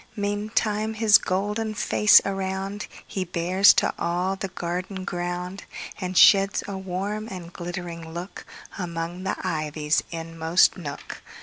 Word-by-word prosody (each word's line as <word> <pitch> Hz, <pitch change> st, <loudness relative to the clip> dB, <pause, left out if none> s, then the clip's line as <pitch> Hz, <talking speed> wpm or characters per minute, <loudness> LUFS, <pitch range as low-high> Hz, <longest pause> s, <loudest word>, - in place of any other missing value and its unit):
Meantime 210 Hz, +1 st, -1 dB
his 220 Hz, -1 st, +6 dB
golden 210 Hz, +4 st, -2 dB
face 210 Hz, 0 st, +6 dB
aroundHe 195 Hz, -1 st, -4 dB
bears 185 Hz, +3 st, +5 dB
to -, -, +1 dB
all 180 Hz, +3 st, 0 dB
the 195 Hz, 0 st, -4 dB
garden 185 Hz, +1 st, -4 dB
ground, 175 Hz, +1 st, -4 dB, 0.3 s
And 185 Hz, -1 st, -3 dB
sheds 195 Hz, -3 st, +6 dB
a 200 Hz, -, -5 dB
warm 190 Hz, +3 st, -4 dB
and 180 Hz, -4 st, -8 dB
glittering 175 Hz, -1 st, -6 dB
lookAmong 175 Hz, 0 st, -7 dB
the -, -, 0 dB
ivy's 155 Hz, -2 st, 0 dB
inmost 165 Hz, +1 st, +2 dB
nook. 150 Hz, -6 st, -8 dB
185 Hz, 115 wpm, -25 LUFS, 175-200 Hz, 0.3 s, his